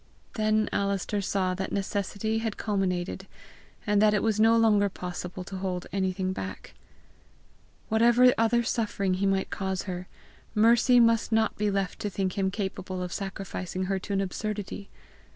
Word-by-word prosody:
Then 215 -1 +1
Alister 200 +1 0
saw 185 -1 0
that 190 +1 -4
necessity 200 +2 -1
had 225 -2 -3
culminated, 190 -2 -2 0.6
and 210 -2 +3
that 215 0 +5
it 205 - 0
was 220 -2 +1
no 225 +1 +5
longer 210 -3 +4
possible 180 0 -6
to 190 +1 -7
hold 185 -1 -3
anything 190 -1 -1
back. 95 - -7 1.1
Whatever 240 +3 +5
other 230 +1 +2
suffering 205 -5 -1
he 195 +2 0
might 195 0 0
cause 190 -1 -2
her, 180 -1 -5 0.5
Mercy 235 +3 +5
must 230 -1 +3
not 220 -1 +2
be 210 0 0
left 195 -3 -2
to 205 - -2
think 190 -1 -2
him 195 -2 +1
capable 190 -2 -4
of 180 - -5
sacrificing 190 -1 -4
her 190 +1 -1
to 200 - -5
an 195 - +1
absurdity! 205 +1 -4
200 Hz, 155 wpm, -27 LUFS, 190-215 Hz, 1.1 s, that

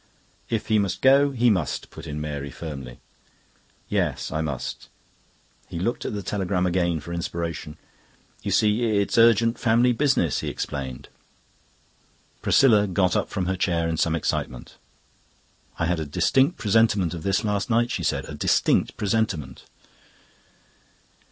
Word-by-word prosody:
"If 115 -2 -1
he 110 -1 +2
must 95 -3 -2
go, 140 +2 +6
he 125 -3 +2
must," 90 -7 -2
put - - -10
in 75 0 -5
Mary 70 -2 -4
firmly. 70 -4 -8 0.9
"Yes, - - -1
I 80 +1 -1
must." 75 -5 -5 0.8
He - - -7
looked 100 +8 -2
at - - -3
the 100 - -4
telegram 95 -1 -1
again 85 -2 +1
for 85 +4 -8
inspiration. 85 -2 -4 0.6
"You - - -4
see, 105 +2 +2 0.2
it's 100 +3 +1
urgent 115 0 +4
family 120 +1 +3
business," 125 - +1
he - - -5
explained. 65 -2 -5 1.3
Priscilla 105 -6 +4
got 90 -1 +1
up - - 0
from 95 -2 -2
her 95 +1 -1
chair 85 -2 0
in 80 - -1
some 80 +1 +1
excitement. 65 -5 -3 1.0
"I 85 - 0
had 90 0 0
a 80 - -3
distinct 135 - +2
presentiment 105 -5 +2
of 85 - -6
this 95 +5 0
last 105 0 -1
night," 120 +1 +2
she - - -2
said. - - -1
"A - - -8
distinct - - +1
presentiment." 105 -7 -2
95 Hz, 145 wpm, -24 LUFS, 80-115 Hz, 1.3 s, go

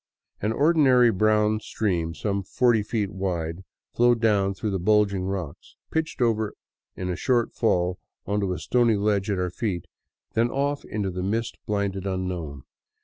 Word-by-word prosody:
An 105 - 0
ordinary 135 -4 +5
brown 110 +1 +2
stream 85 -7 -2
some 100 0 -1
forty 115 +3 +2
feet 105 -2 -2
wide 90 -2 -3 0.3
flowed 120 0 +4
down 100 -4 +2
through 100 -2 -2
bulging 100 -1 +2
rocks, 95 -6 -5 0.2
pitched 160 -4 -1
over 110 -2 0 0.4
in 90 -1 -3
a - - -2
short 120 +1 +1
fall 90 -5 +1 0.3
on 100 +1 0
to 100 -2 -1
a 90 - -2
stony 120 -3 +2
ledge 100 -1 0
at 100 - 0
our 90 -1 -1
feet, 90 -4 -3 0.5
then 115 +1 +2
off 140 +2 -1
into 100 -3 -3
the 90 +1 -4
mist 110 +5 -2
blinded 100 -2 -1
unknown. 90 -7 -4
100 Hz, 155 wpm, -25 LUFS, 95-115 Hz, 0.5 s, ordinary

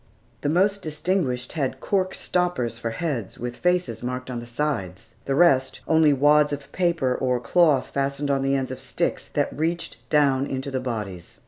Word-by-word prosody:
The 145 - 0
most 195 +5 +2
distinguished 155 -5 -1
had 140 -5 -2
cork 190 -2 0
stoppers 130 -11 -1
for 115 - -2
heads, 120 - -3
with 120 0 -5
faces 180 -11 0
marked 125 +1 -4
on 120 - -3
the 120 - -9
sides, 115 - -3
the 135 - 0
rest, 135 -5 +3
only 160 -2 +5
wads 150 +2 +4
of 140 -1 -6
paper 170 -8 +1
or 125 -1 0
cloth 150 0 +3
fastened 140 +1 -1
on 135 -1 +1
the 135 0 +1
ends 130 -1 -2
of 130 - -6
sticks - - -2
that - - 0
reached 165 0 -2
down 140 -2 +3
into 135 +1 -4
the 130 - -1
bodies. 105 -8 -5
135 Hz, 180 wpm, -24 LUFS, 125-160 Hz, -, only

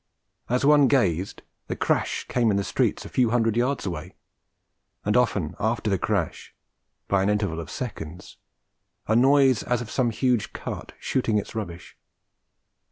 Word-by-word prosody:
As 125 +3 +1
one 145 -1 +6
gazed, 95 - +1 0.2
the - - -3
crash - - 0
came 120 -2 +2
in 100 - +2
the 100 - 0
streets - - 0
a - - -6
few 125 -3 +2
hundred 115 -2 +2
yards 130 +4 0
away; 85 -1 -5 0.9
and - - +1
often - - +1
after 110 -1 0
the 95 - +1
crash, 100 -6 -2 0.5
by 100 -1 +2
an 100 - +1
interval 100 -6 0
of 85 - -7
seconds, 90 -8 -7 0.7
a 110 - +2
noise 135 0 +5
as 125 -1 0
of 120 -2 -7
some 125 -3 +1
huge 120 -1 0
cart - - -6
shooting 115 -5 0
its 100 - -3
rubbish. 90 -6 -7
110 Hz, 160 wpm, -25 LUFS, 95-125 Hz, 0.9 s, one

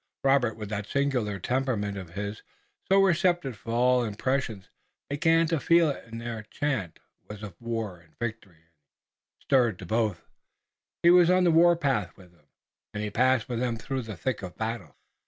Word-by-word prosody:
Robert, 135 -5 +3
with 105 -2 -7
that 105 -1 -4
singular 125 -7 0
temperament 115 -2 -1
of 90 -3 -8
his, 105 +1 -4 0.5
so 195 0 +6
receptive 175 - +1
to - - -10
all 125 +2 +3
impressions, 115 -2 -2 0.4
began 165 +3 +3
to 165 -1 0
feel 170 0 +4
it. 125 - -9
Their 115 -1 -5
chant 110 - -3 0.3
was 105 0 -8
of 100 -4 -7
war 115 -6 -4
and 80 -2 -25
victory 110 -6 -5
and 80 - -37 0.7
he - - -28
stirred 120 -8 +3
to 95 - -9
both. 110 -2 -1 0.8
He 170 - +7
was 175 -1 +6
on 185 0 +4
the 175 - +4
warpath 160 - +3
with 90 -2 -16
them, 85 - -29 0.5
and 105 - -2
he 105 - -3
passed 130 0 +2
with 120 -2 -3
them 120 -2 -1
through 135 +4 -3
the 110 -5 -8
thick 130 +6 -2
of 90 -2 -8
battle. 110 - -4
115 Hz, 175 wpm, -27 LUFS, 105-140 Hz, 0.8 s, He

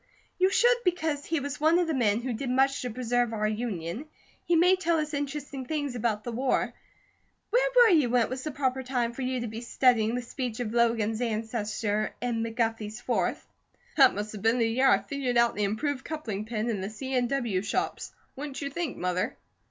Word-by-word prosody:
"You 375 +1 +5
should 480 +4 +4
because 320 -5 0
he 325 -1 0
was 285 +1 -5
one 320 +2 +5
of 355 - +2
the 325 - -1
men 230 -4 +2
who 250 0 -2
did 245 +3 -4
much 270 +2 +2
to 250 - -3
preserve 245 0 0
our 215 -1 0
Union, 215 - -3 0.4
he 345 - +2
may 360 +3 +5
tell 340 -2 +1
us 305 -1 -2
interesting 285 -2 -4
things 290 -4 -2
about 220 -3 -1
the 240 - -4
war. 255 +3 0 0.8
Where - - +3
were 485 -2 +8
you 300 -8 +4
when 245 0 +4
it - - -3
was 255 0 -4
the 310 - -3
proper 265 -2 -1
time 250 -2 -1
for 265 - -6
you 255 -1 -1
to 235 - -3
be 220 +1 -6
studying 235 -2 +2
the 250 - -2
speech 245 -1 -4
of 230 -3 -3
Logan's 230 -1 +2
ancestor 215 -2 -2
in 240 -2 -1
McGuffey's 225 -1 -2
Fourth?" 225 -8 -1 0.5
"That 270 - +6
must 210 +1 -4
have 210 - -8
been 225 +3 +3
the 230 -2 +2
year 260 +4 +3
I - - +6
figured 265 -3 -2
out 235 0 +4
the 210 - 0
improved 255 +7 -2
coupling 225 -10 -4
pin 220 0 -2
in 215 -5 -1
the 195 - -3
C. 260 +5 -6
N. 250 -1 +2
W. 235 -8 0
shops, 200 - -2 0.2
wouldn't 280 0 -6
you 280 -1 -4
think, 340 0 -3
Mother?" 180 0 -1
245 Hz, 215 wpm, -28 LUFS, 225-280 Hz, 0.8 s, were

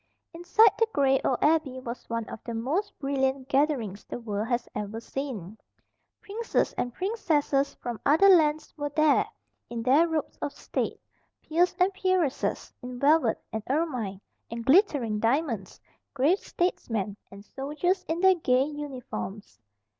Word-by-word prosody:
Inside 350 +6 +5
the 455 - +4
gray 270 -1 +3
old 255 - +1
Abbey 300 -4 +2
was 245 -1 -8
one 230 -1 -2
of - - -9
the 235 - -5
most 280 - -2
brilliant 270 -1 -1
gatherings 265 -8 0
the - - -7
world 215 -2 -3
has 240 0 -1
ever 210 +2 -4
seen. 230 -6 -6 0.6
Princes 445 +3 -1
and 245 - -2
princesses 305 - 0
from 240 -2 -6
other 325 +7 +5
lands 310 -4 +4
were 290 -1 -3
there, 305 0 +3 0.4
in 235 -1 -4
their 280 +7 +5
robes 320 -3 -3
of 285 - -3
state; - - -3 0.4
peers 345 +3 +1
and 370 +2 +3
peeresses, 370 -7 0
in 250 0 -7
velvet, 285 -4 +3
and 220 - -2
ermine, 255 - -1 0.3
and 230 0 -6
glittering 270 - +3
diamonds; 230 - -1 0.4
grave 295 +9 +3
statesmen; 225 - -2
and 200 +1 -13
soldiers 305 - -1
in 330 +2 -2
their 380 0 +7
gay 260 -7 +2
uniforms. 260 - -6
275 Hz, 145 wpm, -27 LUFS, 235-320 Hz, 0.6 s, their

